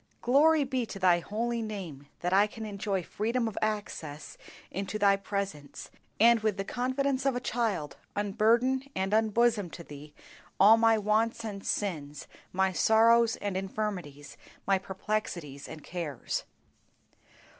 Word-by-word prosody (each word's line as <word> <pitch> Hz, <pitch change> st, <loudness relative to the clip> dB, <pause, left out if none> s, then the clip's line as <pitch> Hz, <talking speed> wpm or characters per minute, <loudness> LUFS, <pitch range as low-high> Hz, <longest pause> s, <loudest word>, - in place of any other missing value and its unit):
Glory 295 Hz, +5 st, +5 dB
be 260 Hz, -2 st, -1 dB
to 215 Hz, -, -7 dB
Thy 180 Hz, -2 st, +4 dB
holy 230 Hz, +6 st, -2 dB
name 185 Hz, -11 st, -6 dB
that 180 Hz, +1 st, -1 dB
I 200 Hz, +2 st, +5 dB
can 220 Hz, +1 st, -8 dB
enjoy 200 Hz, -2 st, -2 dB
freedom 230 Hz, +6 st, -1 dB
of 220 Hz, -, -5 dB
access 165 Hz, -9 st, -4 dB, 0.4 s
into 195 Hz, +2 st, -3 dB
Thy 200 Hz, -1 st, +4 dB
presence, 195 Hz, -7 st, -5 dB, 0.3 s
and 235 Hz, +1 st, +6 dB
with 215 Hz, -2 st, 0 dB
the 195 Hz, -, -2 dB
confidence 260 Hz, +4 st, -1 dB
of 270 Hz, -2 st, +1 dB
a -, -, 0 dB
child 220 Hz, -, -2 dB, 0.2 s
unburden 230 Hz, +6 st, +2 dB
and 190 Hz, +2 st, -1 dB
unbosom 220 Hz, -2 st, +2 dB
to 170 Hz, -, -8 dB
Thee 150 Hz, -1 st, -12 dB, 0.4 s
all 210 Hz, +3 st, +8 dB
my 225 Hz, 0 st, +4 dB
wants 220 Hz, +2 st, +1 dB
and 200 Hz, -2 st, -6 dB
sins, 150 Hz, -8 st, -3 dB, 0.2 s
my 190 Hz, +1 st, +1 dB
sorrows 225 Hz, +4 st, +4 dB
and 200 Hz, -2 st, -2 dB
infirmities, 185 Hz, -7 st, -4 dB, 0.3 s
my 195 Hz, -1 st, +3 dB
perplexities 185 Hz, -7 st, -4 dB
and 155 Hz, -2 st, -10 dB
cares. 165 Hz, -7 st, -4 dB
205 Hz, 140 wpm, -29 LUFS, 185-230 Hz, 0.4 s, all